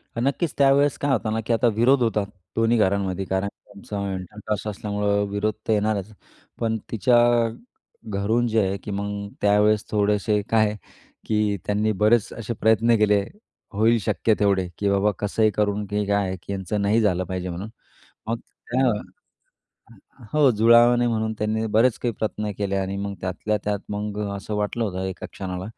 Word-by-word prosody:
तर 115 - -2
नक्कीच 140 +6 0
त्यावेळेस 140 +1 +4
काय 145 - -1
होतं 110 -4 0
ना 110 - 0
की 120 - +1
आता 120 +2 +3
विरोध 125 +3 +4
होता 110 -3 +1 0.3
दोन्ही 115 +1 +3
घरांमध्ये 95 -2 0
कारण 95 +1 -1
की 100 - -14
आमचं 100 0 -4
इंटरकास्ट 105 +3 -5
असल्यामुळं 105 0 -1
विरोध 100 +2 -1
तर 110 - +3
येणारच. 105 -1 0 0.5
पण 115 -1 0
तिच्या 120 +3 +3 0.9
घरून 110 +4 +1
जे 110 -1 +2
आहे 95 +1 -2
की 105 - -5
मग 100 0 -3
त्यावेळेस 105 +1 +3
थोडेसे 105 0 +1
काय 110 -1 +4
आहे, 105 0 -2 0.5
की 105 -2 +1
त्यांनी 105 +1 +1
बरेच 105 +2 +2
असे 115 0 -4
प्रयत्न 110 +1 +3
केले, 105 -1 +3 0.5
होईल 110 +3 +3
शक्य 110 +4 +1
तेवढे, 100 -3 +2
की 100 - 0
बाबा 100 +1 +2
कसंही 105 +1 +1
करून 105 0 0
की 105 +1 -2
काय 100 -1 +1
आहे, 95 0 -4
की - - -7
यांचं 100 +2 -2
नाही 105 +3 +2
झालं 95 -4 +1
पाहिजे 90 0 -4
म्हणून. 90 +5 -6 0.6
मग 115 +1 -1
त्या 130 +3 -3 0.8
ह 115 +3 -21
हो, 145 -3 +6
जुळावं 120 +2 +5
नाही 120 0 +2
म्हणून 110 -1 -1
त्यांनी 110 +1 -1
बरेच 110 +3 +3
काही 120 - -1
प्रयत्न 105 0 -3
केले 100 -1 -1
आणि 95 0 -2
मग 100 0 -4
त्यातल्या 95 +3 -2
त्यात 105 0 0
मग 105 0 -4
अ, 100 - -4
असं 100 +2 -5
वाटलं 105 +3 -1
होतं 95 -3 -3
एका 95 -1 -6
क्षणाला, 90 -1 -5
105 Hz, 175 wpm, -23 LUFS, 100-115 Hz, 0.9 s, हो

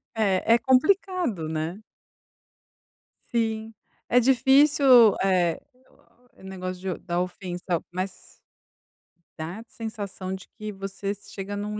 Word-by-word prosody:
É, 215 +1 +3
é 235 - +1
complicado, 275 - +1
né. 160 +5 -3 1.5
Sim. 225 -1 -1 0.3
É 245 - +4
difícil, 265 -2 +6
eh, 180 -3 +2 0.7
o - - -19
negócio 185 -1 -5
de - - -18
da 175 +1 0
ofensa, 180 -1 -3
mas 185 +1 -6 1.0
dá 175 +8 -6
sensação 205 -4 -6
de 190 -1 -8
que 215 -2 -7
vocês 195 +1 -6
chega 200 +1 -5
num 210 +1 -4
200 Hz, 105 wpm, -25 LUFS, 185-230 Hz, 1.5 s, difícil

